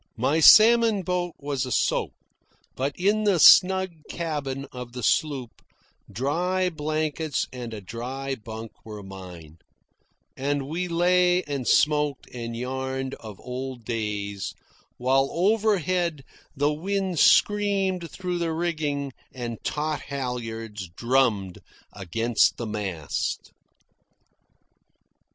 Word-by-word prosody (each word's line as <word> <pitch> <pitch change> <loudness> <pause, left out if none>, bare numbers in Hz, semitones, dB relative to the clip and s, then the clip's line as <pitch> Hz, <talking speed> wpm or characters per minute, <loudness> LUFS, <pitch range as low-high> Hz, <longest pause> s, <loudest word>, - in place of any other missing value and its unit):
My 135 +7 +1
salmon 220 +3 +7
boat 180 -1 -2
was 140 -2 -2
a 130 - -5
soak, - - +1 0.6
but 135 +2 -2
in 205 +4 +2
the 200 -5 +3
snug 190 +2 +7 0.2
cabin 145 -5 -3
of 125 -1 -8
the 125 -1 -6
sloop 135 -2 0 0.5
dry 180 - 0
blankets 155 -1 -2
and 120 -2 -6
a 110 -2 -7
dry 130 +7 -5
bunk 110 -2 -8
were 105 -2 -9
mine; 90 -5 -11 0.8
and 140 0 -2
we 175 +5 -2
lay 180 +1 +3
and 140 -4 -4
smoked 150 -2 +2
and 115 -1 -5
yarned 130 +1 -3
of 105 -4 -10
old 125 -1 -6
days, 105 -4 -3 0.4
while 135 +2 +2
overhead 185 -5 +1 0.3
the 145 +2 +2
wind 190 +1 -2
screamed 195 -4 +3
through 180 -2 -4
the 165 -1 -1
rigging 150 -5 -2 0.2
and 120 -3 -6
taut 155 0 -2
halyards 115 -7 -5
drummed 115 -7 +1 0.3
against 115 +5 +1
the 120 - -4
mast. 100 -8 -3
140 Hz, 110 wpm, -25 LUFS, 115-175 Hz, 0.8 s, salmon